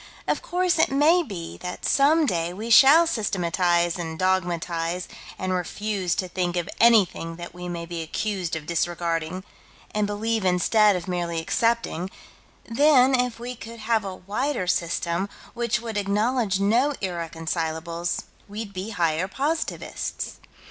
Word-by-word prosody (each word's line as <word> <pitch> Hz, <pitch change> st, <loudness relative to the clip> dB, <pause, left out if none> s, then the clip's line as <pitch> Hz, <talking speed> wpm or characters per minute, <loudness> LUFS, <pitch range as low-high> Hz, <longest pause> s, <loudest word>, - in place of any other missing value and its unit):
Of -, -, 0 dB
course 360 Hz, -2 st, 0 dB
it 320 Hz, -, +4 dB
may 300 Hz, +6 st, +4 dB
be 190 Hz, -, -7 dB
that 180 Hz, 0 st, -6 dB
some 300 Hz, +4 st, +4 dB
day 170 Hz, -7 st, -1 dB
we 220 Hz, +5 st, -5 dB
shall 285 Hz, +8 st, +8 dB
systematize 175 Hz, -, +1 dB
and 160 Hz, -2 st, -4 dB
dogmatize 175 Hz, -1 st, -1 dB, 0.3 s
and 185 Hz, 0 st, -2 dB
refuse 190 Hz, 0 st, -2 dB
to 185 Hz, -, -2 dB
think 180 Hz, -1 st, -2 dB
of 175 Hz, -, -1 dB
anything 200 Hz, -8 st, +4 dB
that 175 Hz, 0 st, -8 dB
we 180 Hz, 0 st, -7 dB
may 170 Hz, -1 st, -4 dB
be 170 Hz, 0 st, -5 dB
accused 180 Hz, +1 st, -2 dB
of 155 Hz, -2 st, -5 dB
disregarding, 170 Hz, +1 st, -1 dB, 0.5 s
and 210 Hz, -1 st, +1 dB
believe 220 Hz, +1 st, -1 dB
instead 200 Hz, +3 st, +4 dB
of 180 Hz, -1 st, -4 dB
merely 175 Hz, -2 st, -2 dB
accepting: 230 Hz, -2 st, 0 dB, 0.6 s
then, 265 Hz, +1 st, +4 dB
if 250 Hz, -2 st, +1 dB
we 245 Hz, +1 st, -5 dB
could 230 Hz, 0 st, -10 dB
have 225 Hz, -1 st, +1 dB
a 190 Hz, -2 st, -5 dB
wider 210 Hz, +5 st, -2 dB
system, 170 Hz, +2 st, -1 dB, 0.2 s
which 235 Hz, -2 st, 0 dB
would 225 Hz, -2 st, -4 dB
acknowledge 210 Hz, +1 st, +1 dB
no 235 Hz, +9 st, +3 dB
irreconcilables 165 Hz, -1 st, -3 dB, 0.2 s
we'd 205 Hz, 0 st, -6 dB
be 185 Hz, +3 st, -5 dB
higher 170 Hz, -3 st, 0 dB
positivists. 295 Hz, +9 st, -3 dB
190 Hz, 140 wpm, -25 LUFS, 170-230 Hz, 0.6 s, shall